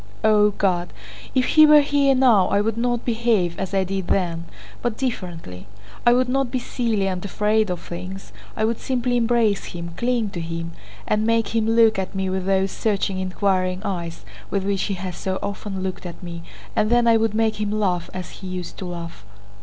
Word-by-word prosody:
"O 210 -1 +5
God, 180 -3 -1 0.4
if 255 -1 +3
he 310 -1 +7
were 300 0 +8
here 280 -1 +3
now 240 -8 +5
I 200 - +2
would 215 +1 0
not 240 0 -1
behave 225 -7 +1
as 190 -2 -3
I 195 -1 +2
did 190 -1 -3
then, 170 -3 0 0.4
but 240 -2 -2
differently. 175 - -5 0.4
I 240 - +8
would 250 +1 +2
not 270 0 0
be 255 - -1
silly 230 -5 -1
and 185 -2 -3
afraid 210 +2 +1
of 180 -1 -2
things, 185 - -8 0.2
I 220 - +2
would 225 0 -1
simply 250 -1 -1
embrace 230 -4 +2
him, 170 -1 -6
cling 235 -4 0
to 175 - -4
him, 165 0 -4 0.4
and 215 0 +1
make 230 0 +2
him 225 -1 0
look 225 -2 +4
at 190 +1 -4
me 190 -1 -1
with 190 0 -2
those 195 0 +2
searching 200 -3 -1
inquiring 185 0 0
eyes 170 -4 -4 0.2
with 195 -1 -1
which 195 -1 0
he 200 - -2
has 180 -1 -5
so 190 -1 -3
often 200 -1 -4
looked 185 -1 -4
at 175 - -10
me, 170 -1 -6 0.3
and 215 - +2
then 240 0 +4
I 230 -1 +5
would 225 -1 0
make 220 -1 +1
him 210 - 0
laugh 185 -5 0
as 185 -1 -6
he 190 - -9
used 180 -1 -6
to 190 - -5
laugh. 170 - -7
200 Hz, 200 wpm, -22 LUFS, 185-230 Hz, 0.4 s, were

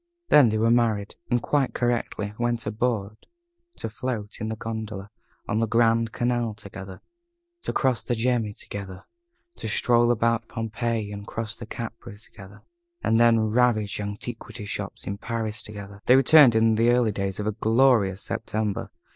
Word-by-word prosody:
Then 140 -6 +7
they 110 - 0
were 115 +1 +3
married, 110 -4 +1 0.2
and, 120 -2 +1
quite 140 -3 +1
correctly, 115 -4 -1
went 120 -1 -1
abroad 110 -1 -2 0.5
to - - -4
float 110 -2 -5
in 110 0 -2
a - - -3
gondola 110 -2 -6 0.4
on 110 - 0
the 115 - +1
Grand 115 0 +3
Canal 120 -3 -1
together; 100 -3 -10 0.6
to - - -3
cross 130 -6 +1
the 120 - -2
Gemmi 115 -3 0
together; 95 -2 -8 0.5
to - - -5
stroll 120 +2 +3
about 115 -1 +1
Pompeii 115 -2 -3
and 100 0 -8
cross 115 0 -4
to 115 - -9
Capri 110 -2 -7
together; 100 -1 -14 0.4
and 115 - +3
then 115 -1 +5
ravage 110 -4 +2
antiquity 105 +1 -6
shops - - -5
in 100 0 -4
Paris 110 -2 -3
together. 100 -1 -10
They 125 - +7
returned 135 -2 +7
in 110 0 +4
the 115 +1 +4
early 120 -2 +3
days 100 -1 -3
of 105 - -2
a 105 - +1
glorious 110 -3 +3
September. 105 -2 -3
110 Hz, 160 wpm, -25 LUFS, 105-120 Hz, 0.6 s, Then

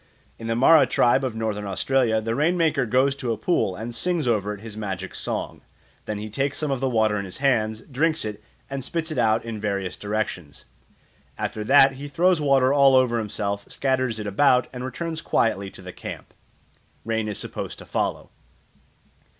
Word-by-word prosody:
In 115 - -6
the 115 - 0
Mara 145 +6 +6
tribe 125 +3 +3
of 125 -4 -2
Northern 105 -2 -3
Australia 115 +3 +1
the 115 +1 -2
rain 155 +8 +1
maker 160 -7 +2
goes 130 +4 +2
to 125 -4 -2
a 115 - -1
pool 110 - 0
and 115 +4 -6
sings 170 +2 0
over 105 -3 +1
it 105 -1 -7
his 110 -1 -8
magic 95 -3 -5
song. - - -4 0.4
Then 105 - -3
he 105 +1 -5
takes 135 +6 -2
some 150 -2 -1
of 135 - -1
the 135 0 0
water 110 -3 +2
in 100 - -3
his 90 - -6
hands, 110 -5 +1
drinks 155 +2 0
it, 105 0 -6 0.2
and 135 -1 -5
spits 160 +3 -3
it 145 - -2
out 110 -1 +2
in 110 -2 -5
various 100 -3 -2
directions. 100 -8 -4 0.7
After 110 - -3
that 135 +2 +7
he 145 +2 -6
throws 175 +3 +2
water 135 -2 +3
all 140 -2 +6
over 125 -2 +3
himself, 100 -1 -3
scatters 130 -4 0
it 105 - -5
about, 125 +5 +3
and 125 0 -6
returns 160 +6 -4
quietly 100 -9 0
to 95 - -12
the 90 0 -8
camp. - - -8 0.7
Rain 110 -1 -1
is 105 - -3
supposed - - -5
to - - -11
follow. - - -2
115 Hz, 190 wpm, -24 LUFS, 105-135 Hz, 0.7 s, that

